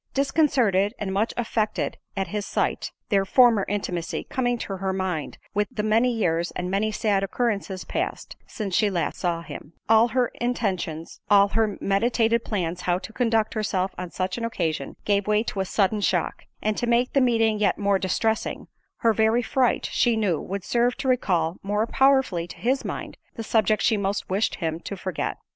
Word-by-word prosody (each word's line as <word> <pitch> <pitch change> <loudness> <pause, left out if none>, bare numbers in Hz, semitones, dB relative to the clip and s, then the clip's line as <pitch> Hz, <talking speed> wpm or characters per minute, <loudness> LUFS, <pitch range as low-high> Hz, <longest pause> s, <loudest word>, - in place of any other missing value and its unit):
Disconcerted, 255 - +2
and 195 -2 -3
much 210 +4 +1
affected 220 -2 -1 0.2
at 190 -3 -1
his 210 +2 -2
sight, - - -1 0.2
(their 195 -2 +3
former 225 0 +4
intimacy 180 -4 -3
coming 245 -4 -1
to 195 -4 -5
her 190 0 -1
mind 185 -5 -3 0.2
with 205 0 +1
the 210 - -3
many 225 +4 +3
years, 175 -7 0
and 180 0 -3
many 210 +3 +1
sad 210 -2 +1
occurrences 200 -3 -2
passed, - - -4
since 205 -4 -5
she 210 +3 +3
last 180 -3 -2
saw 170 -2 -1
him) 160 -1 -9
all 225 +1 +6
her 245 0 +1
intentions, 190 -10 -2
all 200 -1 +6
her 220 -1 0
meditated 230 +3 +1
plans 180 -4 -2
how 175 -1 +1
to 220 - -9
conduct 225 -3 +1
herself 195 -4 -1
on 180 -1 -6
such 185 +5 -3
an - - -5
occasion, 160 -11 -2
gave 200 -1 +1
way 210 +1 +3
to 205 - -4
a 190 - 0
sudden 205 +2 +1
shock—and 215 +1 -1
to 240 - -1
make 240 +1 +2
the 275 - +4
meeting 225 -3 +2
yet 210 - +2
more 200 -1 +2
distressing, 220 +4 -1 0.3
her 230 -1 +4
very 220 +3 +2
fright, 255 +1 +1
she 235 -2 +2
knew, 195 -8 +1
would 195 0 -5
serve 240 +3 +1
to 275 - -4
recall 180 -10 +1
more 210 +2 0
powerfully 265 -10 +2
to - - -11
his 260 +3 0
mind, - - -6 0.2
the 225 - -5
subject 215 -1 +2
she 225 - +3
most 200 -1 -2
wished 200 +4 +1
him 165 -2 -3
to 200 +3 -6
forget. 185 -2 -3
210 Hz, 185 wpm, -25 LUFS, 190-230 Hz, 0.3 s, all